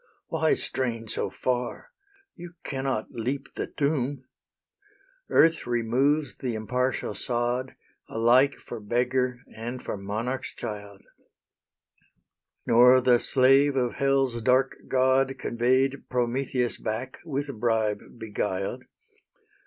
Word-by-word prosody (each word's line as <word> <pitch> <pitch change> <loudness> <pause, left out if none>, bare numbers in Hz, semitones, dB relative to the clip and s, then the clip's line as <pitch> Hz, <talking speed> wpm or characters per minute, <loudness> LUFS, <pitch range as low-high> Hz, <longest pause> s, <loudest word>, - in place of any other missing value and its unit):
Why 160 -1 +2
strain 115 -3 -1
so - - -2
far? 125 - -3 0.4
you 175 -1 -10
cannot 135 -5 -3
leap 130 +4 -3
the - - -4
tomb. 140 -2 -1 1.0
Earth 165 -4 +4
removes 125 +5 +1
the 125 -3 -3
impartial 125 +2 -1
sod 120 +2 -2 0.3
Alike 125 +5 +4
for 120 - -9
beggar 125 +3 0
and 120 +3 -6
for - - -3
monarch's 110 +7 -4
child: 105 -2 -7 1.6
Nor 125 +2 +7
the 125 -1 +4
slave 135 +3 +4
of 125 -2 0
Hell's 135 -3 +1
dark 130 +3 +3
god 130 +1 +2
Convey'd 130 +3 0
Prometheus 125 -1 0
back, 110 +4 -4
with 145 -3 -3
bribe 110 -2 +1 0.2
beguiled. 105 +1 -3
125 Hz, 105 wpm, -26 LUFS, 115-135 Hz, 1.6 s, Nor